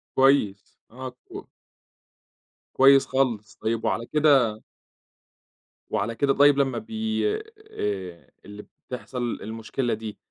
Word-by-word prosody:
كويس، 130 -7 +2
آه 130 +1 -7
كو - - -10 1.3
كويس 135 +1 +6
خالص، 120 -6 -1
طيب 115 0 -1
وعلى 115 - -1
كده 135 -7 +3 1.3
وعلى 110 +2 -2
كده 140 +2 +2
طيب 145 0 +5
لمّا 135 -2 +1
بي 220 0 -2 0.5
آآ، 95 -4 -5
اللي 105 +1 -10 0.2
بتحصل 125 -1 -4
المشكلة 115 +3 -3
دي 110 -1 -6
120 Hz, 105 wpm, -25 LUFS, 110-135 Hz, 1.3 s, كويس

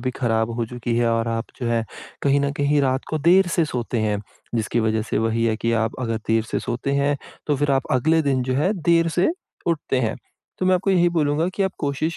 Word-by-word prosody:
भी 130 +1 -1
खराब 115 -2 0
हो 120 - 0
चुकी 120 0 -3
है 120 -1 +2
और 115 0 0
आप 115 +1 -1 0.2
जो 120 - -2
है 115 -1 +1 0.4
कहीं 140 0 +3
न 140 - 0
कहीं 145 0 +2
रात 130 -1 0
को 155 - 0
देर 175 +5 +5
से 165 - +3
सोते 120 -4 -3
हैं, 105 -2 0 0.4
जिसकी 115 +1 0
वजह 110 0 +1
से 110 - -2
वही 115 +1 +1
है 110 -1 +1
कि 115 +1 -1
आप 110 +1 -1
अगर 115 -3 -1
देर 115 0 +3
से - - 0
सोते 125 +3 -3
हैं, 140 +1 +2 0.3
तो 145 -2 +1
फिर 145 +1 0
आप 135 -1 +2
अगले 160 +6 +3
दिन 135 -3 +1
जो 130 0 -1
है 155 +9 +2
देर 165 +1 +3
से 180 - +4 0.4
उठते 150 -5 0
हैं। 110 -2 -1 0.4
तो 185 - 0
मैं 185 - +5
आपको 195 +2 +1
यही 175 -2 +4
बोलूँगा 160 0 +1
कि 200 - 0
आप 190 -1 0
कोशिश 155 +3 -2
130 Hz, 240 wpm, -22 LUFS, 115-155 Hz, 0.4 s, देर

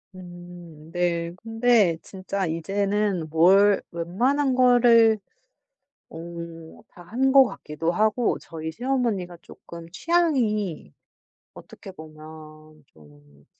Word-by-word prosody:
음. 175 -3 -13
네. 170 -1 -1
근데 225 -6 +2
진짜 190 0 -5
이제는 195 +2 -2
뭘 195 +6 +4
웬만한 250 +12 -1
거를 235 -3 +4 0.9
어 160 - -11 0.7
다 175 - -15
한 260 +8 0
것 270 -1 +7
같기도 165 -5 -4
하고 215 +5 0
저희 160 -1 -7
시어머니가 230 -6 -2
쪼끔 170 -1 -13
취향이 235 - -1 0.6
어떻게 195 - -13
보면 155 -1 -14
좀 75 -2 -22
185 Hz, 185 characters per minute, -24 LUFS, 165-225 Hz, 0.9 s, 것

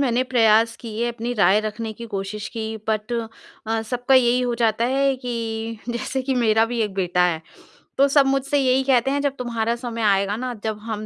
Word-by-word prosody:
मैंने 250 -2 +2
प्रयास 230 -2 +3
किए, 230 +1 -3
अपनी 235 +1 -4
राय 200 0 +4
रखने 215 +1 -4
की 235 +2 -9
कोशिश 200 +1 -4
की 220 0 -3
बट 215 +2 -1 0.5
अ, 225 0 -1
सबका 245 +3 0
यही 250 -1 +4
हो 245 -1 0
जाता 230 -1 +1
है 270 +2 +2
कि 230 -3 -4
जैसे 240 +2 -2
कि 265 0 -1
मेरा 225 -2 +3
भी 240 0 -3
एक 210 -3 -3
बेटा 180 -2 +1
है। 165 -3 0 0.6
तो 275 - +5
सब 280 0 +4
मुझसे 275 +1 +1
यही 265 0 +2
कहते 265 0 +2
हैं 285 0 0
जब 280 -1 -1
तुम्हारा 235 -2 -1
समय 235 -1 -5
आएगा 200 -1 +2
ना 250 +1 -4
जब 215 -1 -3
हम 215 -1 -5
230 Hz, 200 wpm, -22 LUFS, 220-255 Hz, 0.6 s, तो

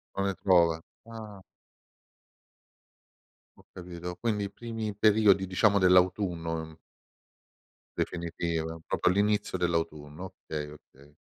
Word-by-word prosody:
Non 100 - 0
le 95 - -1
trova, 85 -4 +3 0.3
ah. 105 -4 -9 2.1
Ho - - -21
capito, 90 -1 -7
quindi 105 -3 0
i - - -5
primi 115 -3 -5
periodi 105 -2 +4
diciamo 100 +2 +3
dell'autunno, 90 -2 +3
mhmm 80 0 -7 1.2
Definitiva, 85 -1 -3
proprio - - +2
all'inizio 105 +1 +1
dell'autunno, 80 0 -2
okay, 75 -1 -4
okay. 75 0 -18
90 Hz, 100 wpm, -29 LUFS, 80-100 Hz, 2.1 s, periodi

